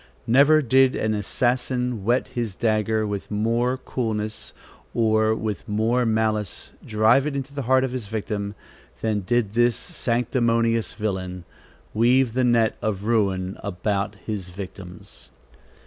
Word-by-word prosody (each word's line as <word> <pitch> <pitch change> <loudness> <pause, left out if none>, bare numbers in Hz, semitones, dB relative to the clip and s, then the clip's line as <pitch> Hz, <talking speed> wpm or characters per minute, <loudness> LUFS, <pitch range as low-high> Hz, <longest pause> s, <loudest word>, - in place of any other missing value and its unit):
Never 145 +5 +5
did 130 +1 +4
an 110 0 0
assassin 125 +2 -1
whet 120 +5 +1
his 115 -5 -3
dagger 110 0 +1
with 100 -2 -4
more 115 +4 0
coolness 110 -4 -4 0.4
or 110 -1 +3
with 110 -1 -4
more 115 +4 +1
malice 110 -2 -1
drive 110 +6 +3
it 140 -2 -2
to 140 - -19
the 140 - -3
heart 130 +1 +3
of 130 - -1
his 125 -5 -5
victim, 105 -1 -3 0.5
than 110 -2 0
did 105 +1 0
this 120 0 +3
sanctimonious 115 -6 0
villain 95 -4 -3 0.5
weave 120 +2 +3
the 130 +1 +1
net 120 -2 +3
of 100 -2 -2
ruin 100 -4 0
about 100 +1 -2
his 100 -5 -4
victims. 90 -1 -10
110 Hz, 130 wpm, -24 LUFS, 105-125 Hz, 0.5 s, Never